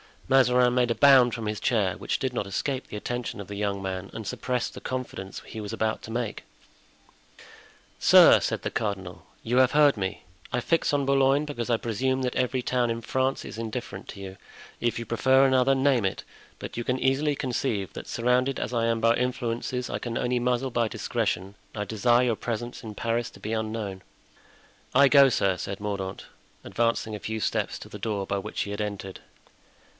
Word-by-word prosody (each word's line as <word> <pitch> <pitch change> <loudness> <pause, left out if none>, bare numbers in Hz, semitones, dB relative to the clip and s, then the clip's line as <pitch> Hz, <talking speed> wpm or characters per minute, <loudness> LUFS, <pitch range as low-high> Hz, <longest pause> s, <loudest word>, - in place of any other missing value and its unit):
Mazarin 125 -2 +4
made 125 -1 +2
a 115 - +1
bound 130 -4 +6
from 115 - -5
his 105 0 -2
chair, 100 -6 +1
which - - -2
did 130 -2 -2
not 105 -5 -2
escape 130 +7 -2
the - - -8
attention 120 0 -4
of 100 - -9
the 100 - -5
young 100 -1 -1
man 95 0 -4
and 110 - -6
suppressed 125 +4 -2
the - - -8
confidence 125 -7 -5
he 110 - -8
was 105 +1 -6
about 110 0 -1
to - - -10
make. 115 -1 -3 1.6
"Sir," - - +8
said - - -2
the - - -3
cardinal, 95 -5 -4 0.2
"you 120 +2 0
have 130 0 +5
heard 145 -4 +5
me? 95 0 -3 0.3
I 125 - 0
fix 165 +2 +1
on 140 -1 +1
Boulogne 135 +1 +3
because 125 -5 -4
I 120 - +4
presume 130 +4 -1
that 125 -1 -2
every 130 0 0
town 125 -1 0
in 115 0 -2
France 130 +3 -1
is - - -8
indifferent 110 -3 -5
to 100 - -8
you; 95 0 -8 0.4
if 120 -1 0
you 115 - -4
prefer 130 +4 +4
another, 130 0 +4
name 135 -5 +2
it; 95 - -2 0.4
but - - -7
you 120 - -3
can 125 - 0
easily 140 +3 +1
conceive 120 - -2
that, - - -8
surrounded 125 +3 +1
as - - -3
I 115 -1 +1
am 115 -1 0
by 115 +1 +4
influences 125 0 -2
I - - -3
can 120 -1 -4
only 125 0 0
muzzle 125 +1 0
by 115 -1 +1
discretion, 100 -4 -2 0.2
I 105 - -2
desire 120 +4 +2
your 115 -3 0
presence 120 +1 -4
in 110 -2 -7
Paris 115 +1 -1
to - - -15
be 110 - -4
unknown." 110 -3 -3 0.9
"I 140 +1 +7
go, 140 -1 +8
sir," 100 -7 +1
said 100 +2 -5
Mordaunt, 100 -2 -4 0.4
advancing 115 -1 0
a - - -6
few 110 +1 -4
steps - - -1
to - - -11
the - - -9
door 105 -3 -2
by 100 - -1
which - - -4
he 100 - -3
had 105 +1 -3
entered. 100 -2 -5
115 Hz, 200 wpm, -26 LUFS, 105-125 Hz, 1.6 s, Sir